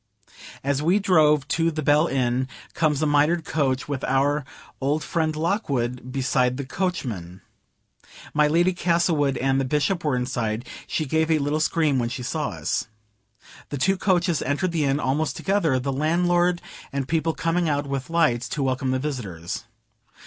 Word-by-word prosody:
As 140 Hz, +1 st, 0 dB
we 175 Hz, +6 st, +3 dB
drove 155 Hz, -8 st, +3 dB
to 165 Hz, +2 st, +2 dB
the 155 Hz, -1 st, -3 dB
"Bell" 150 Hz, +3 st, +4 dB
Inn 130 Hz, -2 st, 0 dB, 0.3 s
comes 155 Hz, -2 st, +1 dB
a -, -, +3 dB
mitred 150 Hz, +3 st, +2 dB
coach 135 Hz, -4 st, 0 dB
with 140 Hz, -2 st, -3 dB
our 140 Hz, +2 st, +1 dB, 0.4 s
old 145 Hz, +3 st, 0 dB
friend 160 Hz, -2 st, -1 dB
Lockwood 135 Hz, -, -1 dB
beside 125 Hz, -1 st, +1 dB
the 140 Hz, -, -4 dB
coachman. 120 Hz, -, -3 dB, 0.9 s
My 150 Hz, 0 st, +4 dB
Lady 175 Hz, +4 st, +3 dB
Castlewood 170 Hz, -6 st, +1 dB
and 135 Hz, +1 st, +1 dB
the -, -, 0 dB
Bishop 150 Hz, +6 st, 0 dB
were 150 Hz, -4 st, +1 dB
inside; 120 Hz, -2 st, -2 dB, 0.2 s
she 155 Hz, -, -1 dB
gave 160 Hz, +3 st, +1 dB
a 160 Hz, -, +4 dB
little 145 Hz, +1 st, 0 dB
scream 155 Hz, -3 st, +2 dB
when 120 Hz, -1 st, -1 dB
she 125 Hz, 0 st, -5 dB
saw 150 Hz, +4 st, -2 dB
us. 85 Hz, -3 st, -2 dB, 0.8 s
The 145 Hz, -, -3 dB
two 190 Hz, +9 st, +2 dB
coaches 175 Hz, -4 st, +1 dB
entered 145 Hz, +6 st, 0 dB
the 160 Hz, -3 st, 0 dB
inn 135 Hz, +1 st, +1 dB
almost 145 Hz, +1 st, 0 dB
together; 190 Hz, -9 st, +1 dB
the 135 Hz, +2 st, -2 dB
landlord 175 Hz, +4 st, +2 dB, 0.3 s
and 140 Hz, -1 st, -2 dB
people 160 Hz, +1 st, 0 dB
coming 165 Hz, 0 st, 0 dB
out 145 Hz, -1 st, 0 dB
with 135 Hz, 0 st, -4 dB
lights 130 Hz, -9 st, +2 dB
to 140 Hz, -, -2 dB
welcome 130 Hz, 0 st, 0 dB
the 130 Hz, -, +1 dB
visitors. 110 Hz, -, -5 dB
145 Hz, 165 wpm, -24 LUFS, 130-165 Hz, 0.9 s, Bell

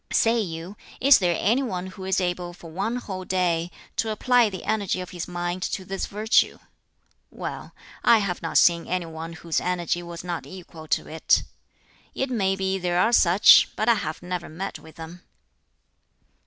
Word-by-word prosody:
"Say 230 Hz, +1 st, +3 dB
you, 175 Hz, 0 st, -5 dB, 0.2 s
is 275 Hz, +1 st, +7 dB
there 175 Hz, -3 st, +1 dB
any 235 Hz, +7 st, +2 dB
one 185 Hz, -9 st, -3 dB
who 185 Hz, 0 st, -9 dB
is 190 Hz, 0 st, +1 dB
able 175 Hz, -1 st, -2 dB
for 170 Hz, -2 st, -12 dB
one 200 Hz, +8 st, -2 dB
whole 190 Hz, -6 st, -5 dB
day 175 Hz, -2 st, 0 dB, 0.3 s
to 225 Hz, -, 0 dB
apply 240 Hz, +1 st, +3 dB
the 185 Hz, -3 st, -7 dB
energy 205 Hz, -4 st, -1 dB
of 180 Hz, 0 st, -7 dB
his 175 Hz, -3 st, -5 dB
mind 175 Hz, +1 st, -3 dB
to 190 Hz, +1 st, -3 dB
this 195 Hz, +1 st, -3 dB
virtue? 215 Hz, +2 st, +2 dB, 0.7 s
Well, -, -, -7 dB, 0.3 s
I 230 Hz, -, +6 dB
have 200 Hz, -4 st, -2 dB
not 165 Hz, -, -1 dB
seen 170 Hz, -1 st, +4 dB
any 180 Hz, -1 st, -1 dB
one 165 Hz, +1 st, -7 dB
whose 165 Hz, 0 st, -2 dB
energy 175 Hz, -1 st, -1 dB
was 170 Hz, -1 st, -8 dB
not 175 Hz, -2 st, -5 dB
equal 170 Hz, -4 st, -11 dB
to -, -, 0 dB
it. 160 Hz, +1 st, +2 dB, 0.7 s
It 265 Hz, 0 st, -2 dB
may 195 Hz, -5 st, +1 dB
be 190 Hz, 0 st, -1 dB
there 175 Hz, -1 st, 0 dB
are 225 Hz, +5 st, +3 dB
such, 185 Hz, -2 st, +7 dB
but 215 Hz, -, -1 dB
I 235 Hz, -, +7 dB
have 165 Hz, -6 st, -4 dB
never 180 Hz, -1 st, -4 dB
met 190 Hz, +5 st, -6 dB
with 160 Hz, 0 st, -15 dB
them. 165 Hz, +2 st, -10 dB
180 Hz, 180 wpm, -24 LUFS, 170-200 Hz, 0.7 s, is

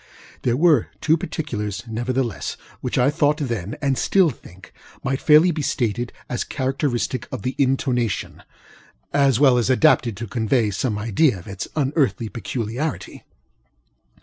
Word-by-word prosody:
There 120 Hz, 0 st, +1 dB
were 155 Hz, -6 st, +4 dB
two 160 Hz, -, +3 dB
particulars, 110 Hz, -, -4 dB
nevertheless, 115 Hz, -, -2 dB, 0.2 s
which -, -, -3 dB
I 125 Hz, +3 st, +4 dB
thought 150 Hz, -1 st, +2 dB
then, 115 Hz, -, -3 dB
and 135 Hz, -2 st, +1 dB
still 185 Hz, -5 st, +3 dB
think, 95 Hz, -5 st, -15 dB, 0.3 s
might 135 Hz, 0 st, -1 dB
fairly 155 Hz, +4 st, +6 dB
be 155 Hz, -2 st, -3 dB
stated 120 Hz, -3 st, -1 dB, 0.2 s
as 125 Hz, -, -2 dB
characteristic 130 Hz, -2 st, -2 dB
of -, -, -5 dB
the 130 Hz, +1 st, -1 dB
intonationŌĆöas 130 Hz, -, -1 dB
well 130 Hz, -2 st, +5 dB
adapted 125 Hz, -3 st, +3 dB
to 115 Hz, -, -4 dB
convey 110 Hz, 0 st, 0 dB
some 105 Hz, +2 st, -1 dB
idea 115 Hz, +3 st, +2 dB
of 85 Hz, -, -12 dB
its 100 Hz, 0 st, -5 dB
unearthly 135 Hz, -5 st, 0 dB
peculiarity. 120 Hz, +7 st, -4 dB
125 Hz, 130 wpm, -22 LUFS, 110-145 Hz, 0.3 s, fairly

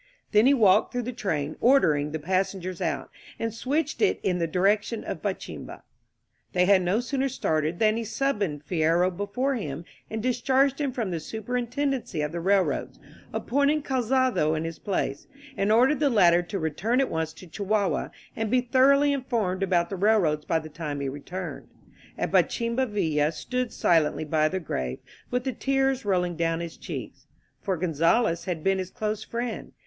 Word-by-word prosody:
Then 215 Hz, +3 st, +5 dB
he 280 Hz, -, +6 dB
walked 210 Hz, -4 st, +4 dB
through 245 Hz, -1 st, -2 dB
the 250 Hz, +2 st, -4 dB
train, 155 Hz, -9 st, -2 dB
ordering 155 Hz, -, +3 dB
the 160 Hz, -, -2 dB
passengers 185 Hz, +2 st, -2 dB
out, -, -, -2 dB, 0.3 s
and 225 Hz, -1 st, -3 dB
switched 285 Hz, +6 st, -2 dB
it 415 Hz, -, +3 dB
in 180 Hz, -2 st, +1 dB
the 165 Hz, -, 0 dB
direction 205 Hz, +6 st, +1 dB
of -, -, -5 dB
Bachimba. -, -, -5 dB, 0.7 s
They 180 Hz, 0 st, +3 dB
had 195 Hz, 0 st, +5 dB
no 185 Hz, +6 st, +1 dB
sooner 270 Hz, +2 st, -1 dB
started 160 Hz, -, -1 dB
than 215 Hz, +1 st, +3 dB
he 230 Hz, -, -2 dB
Summoned 205 Hz, -, -1 dB
Fierro 175 Hz, +2 st, +2 dB
before 205 Hz, +8 st, -1 dB
him 160 Hz, -, -4 dB, 0.2 s
and 220 Hz, 0 st, -4 dB
discharged 260 Hz, +3 st, +2 dB
him 280 Hz, -2 st, 0 dB
from 235 Hz, -7 st, -3 dB
the 170 Hz, -, -2 dB
superintendency 245 Hz, -, -2 dB
of 150 Hz, 0 st, -2 dB
the 170 Hz, -, -4 dB
railroads, 190 Hz, +2 st, +1 dB, 0.3 s
appoint 280 Hz, +3 st, +1 dB
ing 305 Hz, 0 st, +1 dB
Calzado 255 Hz, -, +1 dB
in 155 Hz, -, -2 dB
his 165 Hz, 0 st, -5 dB
place, 185 Hz, -8 st, -2 dB, 0.3 s
and 200 Hz, -1 st, +1 dB
ordered 255 Hz, +6 st, +4 dB
the 295 Hz, -2 st, +3 dB
latter 175 Hz, -7 st, +5 dB
to 175 Hz, +3 st, -5 dB
re* 160 Hz, -3 st, -1 dB
tuhi 225 Hz, -, 0 dB
at 270 Hz, -, +1 dB
once 160 Hz, -1 st, -1 dB
to -, -, -13 dB
Chihuahua 200 Hz, +3 st, -1 dB, 0.3 s
and 225 Hz, -1 st, -2 dB
be 250 Hz, +2 st, +3 dB
thoroughly 275 Hz, +3 st, +4 dB
informed 225 Hz, -9 st, -1 dB
about 175 Hz, -3 st, +1 dB
the -, -, -2 dB
railroads 180 Hz, -7 st, +2 dB
by 165 Hz, -, +1 dB
the 155 Hz, -1 st, -5 dB
time 150 Hz, -2 st, -5 dB
he 140 Hz, -1 st, -2 dB
returned. 175 Hz, +6 st, -6 dB, 0.5 s
At -, -, -2 dB
Ba -, -, +6 dB
chimba 235 Hz, +2 st, -1 dB
Villa 155 Hz, -7 st, +1 dB
stood 250 Hz, +8 st, -3 dB
silently 160 Hz, -2 st, +2 dB
by 155 Hz, 0 st, +2 dB
the 190 Hz, -, -2 dB
grave 65 Hz, -, -3 dB, 0.3 s
with 250 Hz, 0 st, -1 dB
the 260 Hz, -1 st, -2 dB
tears 270 Hz, -2 st, 0 dB
rolling 180 Hz, -3 st, +1 dB
down 165 Hz, 0 st, 0 dB
his 170 Hz, -1 st, -6 dB
cheeks. -, -, -8 dB, 0.3 s
For 190 Hz, -3 st, -1 dB
Gonzales 170 Hz, +2 st, +1 dB
had 170 Hz, -4 st, -3 dB
been 195 Hz, 0 st, +2 dB
his 185 Hz, -1 st, -4 dB
close 215 Hz, -1 st, -3 dB
friend. 235 Hz, 0 st, -5 dB
200 Hz, 180 wpm, -26 LUFS, 165-245 Hz, 0.7 s, he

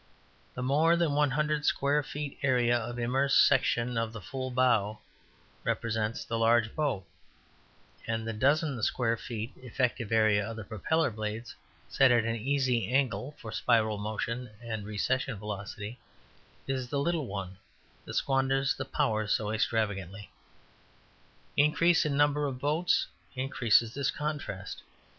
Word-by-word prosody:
The 125 Hz, -, -3 dB
more 155 Hz, +6 st, +4 dB
than 170 Hz, -4 st, +1 dB
100 150 Hz, +1 st, +1 dB
square 145 Hz, +1 st, +2 dB
feet 145 Hz, 0 st, -6 dB
area 125 Hz, -3 st, +3 dB
of 120 Hz, +1 st, -3 dB
immersed 130 Hz, +4 st, +4 dB
section 125 Hz, -3 st, +2 dB
of 115 Hz, -1 st, -2 dB
the 115 Hz, -, -6 dB
full 130 Hz, +5 st, -5 dB
bow 120 Hz, -5 st, +2 dB, 0.7 s
represents 110 Hz, -1 st, -1 dB
the 115 Hz, -1 st, -2 dB
large 115 Hz, 0 st, +3 dB
boat, 140 Hz, -, -1 dB, 1.0 s
and 115 Hz, 0 st, -2 dB
the 115 Hz, -, -2 dB
dozen 140 Hz, +2 st, +1 dB
square 115 Hz, +2 st, +1 dB
feet 115 Hz, 0 st, -5 dB
effective 125 Hz, -2 st, -2 dB
area 110 Hz, -2 st, +4 dB
of 110 Hz, -3 st, -7 dB
propeller 120 Hz, -, 0 dB
blades, 110 Hz, +2 st, -5 dB, 0.3 s
set 135 Hz, -, +4 dB
at 120 Hz, -2 st, +4 dB
an 115 Hz, 0 st, 0 dB
easy 125 Hz, -1 st, 0 dB
angle 130 Hz, -1 st, 0 dB
for 110 Hz, -, -8 dB
spiral 110 Hz, -3 st, +2 dB
motion 115 Hz, +4 st, -3 dB
and 110 Hz, -3 st, -5 dB
recession 125 Hz, +3 st, -1 dB
velocity, 105 Hz, +2 st, -6 dB, 0.7 s
is 130 Hz, -2 st, -2 dB
the 145 Hz, -, -1 dB
little 155 Hz, -1 st, 0 dB
one 95 Hz, -2 st, -6 dB, 0.5 s
that -, -, -7 dB
squanders 135 Hz, 0 st, +2 dB
the -, -, -5 dB
power 110 Hz, -1 st, 0 dB
so 105 Hz, 0 st, 0 dB
extravagantly. 105 Hz, -3 st, -2 dB, 1.2 s
Increase 165 Hz, +4 st, +4 dB
in 140 Hz, -2 st, -1 dB
number 145 Hz, 0 st, +3 dB
of 130 Hz, -2 st, -4 dB
boats 150 Hz, +6 st, +1 dB, 0.3 s
increases 120 Hz, -3 st, +2 dB
this 140 Hz, -1 st, 0 dB
contrast. 140 Hz, -11 st, -4 dB
120 Hz, 135 wpm, -30 LUFS, 110-140 Hz, 1.2 s, more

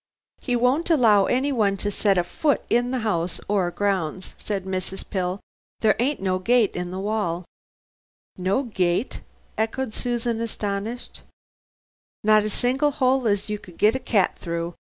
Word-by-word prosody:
"He 245 Hz, -, 0 dB
won't 255 Hz, +8 st, +2 dB
allow 225 Hz, -, +5 dB
anyone 245 Hz, -7 st, +1 dB
to 205 Hz, +1 st, -2 dB
set 200 Hz, -1 st, +2 dB
a 175 Hz, -, +3 dB
foot 290 Hz, -, 0 dB
in 240 Hz, +1 st, +3 dB
the 255 Hz, -1 st, -1 dB
house 170 Hz, -4 st, -1 dB
or 195 Hz, -3 st, +1 dB
grounds," 190 Hz, -2 st, -2 dB
said 195 Hz, -3 st, -3 dB
Mrs. 190 Hz, 0 st, -4 dB
Pill, 185 Hz, -1 st, -2 dB, 0.4 s
"there 215 Hz, -1 st, +4 dB
ain't 270 Hz, +4 st, +1 dB
no 185 Hz, -1 st, 0 dB
gate 230 Hz, +2 st, +3 dB
in 180 Hz, 0 st, -3 dB
the 185 Hz, -, -5 dB
wall 190 Hz, -4 st, -1 dB, 0.5 s
" -, -, -90 dB
"No 230 Hz, +8 st, +2 dB
gate," 190 Hz, -2 st, -1 dB, 0.4 s
echoed 225 Hz, +2 st, -1 dB
Susan 235 Hz, -1 st, -2 dB
astonished. 220 Hz, +1 st, -4 dB, 1.0 s
"Not 215 Hz, 0 st, +5 dB
a 215 Hz, -, -1 dB
single 265 Hz, +7 st, +1 dB
'ole 260 Hz, -2 st, +3 dB
as 205 Hz, -2 st, +1 dB
you 210 Hz, -1 st, -3 dB
could 180 Hz, -4 st, -15 dB
get 215 Hz, +2 st, +4 dB
a 260 Hz, -, -2 dB
cat 220 Hz, -7 st, +1 dB
through. 170 Hz, 0 st, -3 dB
210 Hz, 160 wpm, -24 LUFS, 190-245 Hz, 1.0 s, allow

